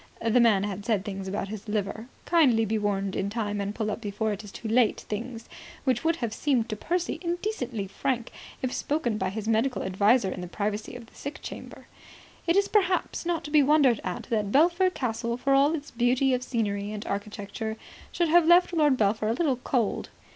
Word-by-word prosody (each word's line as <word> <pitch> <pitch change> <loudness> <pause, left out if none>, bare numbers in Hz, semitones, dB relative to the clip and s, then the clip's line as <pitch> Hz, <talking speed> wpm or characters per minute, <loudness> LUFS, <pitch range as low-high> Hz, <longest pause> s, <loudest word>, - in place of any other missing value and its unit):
(The 230 +2 +2
man 220 -5 +4
had 205 -1 -4
said 210 -3 0
things 195 -2 -5
about 195 0 -3
his 215 0 -7
liver, 210 +2 -2 0.2
kindly 260 -10 +4
be 220 +1 0
warned 200 -2 -1
in 195 - -1
time 205 -2 -2
and 200 +1 -3
pull 215 -2 -1
up 220 - -5
before 215 +1 -2
it 205 - -7
is 205 - -10
too 225 - -7
late 225 0 +3
things, 230 +2 -6 0.4
which 260 +2 +1
would 330 0 +2
have 235 -8 -3
seemed 245 -2 0
to 215 - -2
Percy 345 - -2
indecently 340 - -3
frank 235 +4 -2 0.3
if 255 - -1
spoken 245 -8 -1
by 190 - 0
his 215 +2 -5
medical 225 +4 +1
adviser 200 +2 +3
in 180 - -5
the 180 - -5
privacy 210 +5 -3
of 245 -2 -9
the - - -23
sick 285 +2 -7
chamber.) - - -9 0.6
It 335 - +3
is 400 0 +3
perhaps 370 -4 +1
not 340 -2 0
to 295 - -7
be 300 -1 +6
wondered 280 -5 +4
at 180 -1 -4
that 210 -3 0
Belpher 345 - +4
Castle, 235 -6 -2
for 275 +2 +1
all 280 +4 +4
its 295 -1 -7
beauty 250 +3 +2
of 250 - 0
scenery 210 -5 -2
and 210 0 -6
architecture, 205 +2 -4 0.3
should 345 -2 0
have 340 0 +5
left 350 +1 +6
Lord 300 -5 +3
Belpher 215 0 +1
a 225 - +2
little 270 -1 +1
cold. 245 -3 -1
230 Hz, 205 wpm, -27 LUFS, 205-280 Hz, 0.6 s, be